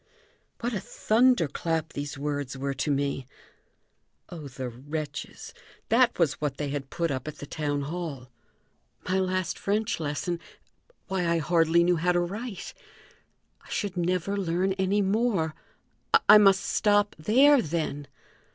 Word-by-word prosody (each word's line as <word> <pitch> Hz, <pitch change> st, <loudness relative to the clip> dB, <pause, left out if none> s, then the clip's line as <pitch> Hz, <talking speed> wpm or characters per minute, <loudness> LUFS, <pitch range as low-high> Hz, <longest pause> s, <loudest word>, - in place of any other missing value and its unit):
What 240 Hz, +1 st, -1 dB
a 205 Hz, -, -1 dB
thunder 235 Hz, -1 st, +2 dB
clap 160 Hz, +2 st, -2 dB
these 145 Hz, 0 st, -5 dB
words 145 Hz, -2 st, -3 dB
were 140 Hz, +1 st, -2 dB
to 135 Hz, +2 st, -2 dB
me! 140 Hz, -2 st, -1 dB, 1.0 s
Oh, 160 Hz, -5 st, -8 dB
the 130 Hz, -1 st, -6 dB
wretches; 145 Hz, +4 st, -6 dB, 0.4 s
that 245 Hz, +1 st, +4 dB
was 160 Hz, -5 st, +1 dB
what 145 Hz, -2 st, -2 dB
they 145 Hz, -1 st, -3 dB
had 135 Hz, -1 st, -4 dB
put 170 Hz, -2 st, -1 dB
up 130 Hz, +1 st, -4 dB
at 155 Hz, -, -6 dB
the -, -, -7 dB
town 145 Hz, -1 st, -2 dB
hall! 145 Hz, -5 st, -5 dB, 0.8 s
My 185 Hz, +1 st, +1 dB
last 185 Hz, -2 st, -1 dB
French 210 Hz, 0 st, -1 dB
lesson! 160 Hz, +3 st, -2 dB, 0.7 s
Why, 185 Hz, -2 st, -1 dB
I 170 Hz, -, +2 dB
hardly 165 Hz, +1 st, +3 dB
knew 175 Hz, 0 st, +3 dB
how 180 Hz, +2 st, +2 dB
to 175 Hz, -, +2 dB
write! 200 Hz, +3 st, -5 dB, 0.9 s
I -, -, -19 dB
should 200 Hz, -3 st, -2 dB
never 180 Hz, +2 st, 0 dB
learn 190 Hz, 0 st, 0 dB
any 195 Hz, +2 st, +1 dB
more! 195 Hz, -6 st, +1 dB, 0.7 s
I 210 Hz, -, +10 dB
must 195 Hz, -2 st, +5 dB
stop 205 Hz, -1 st, +2 dB
there, 265 Hz, -, +5 dB
then! 150 Hz, -4 st, -3 dB
170 Hz, 145 wpm, -27 LUFS, 145-195 Hz, 1.0 s, I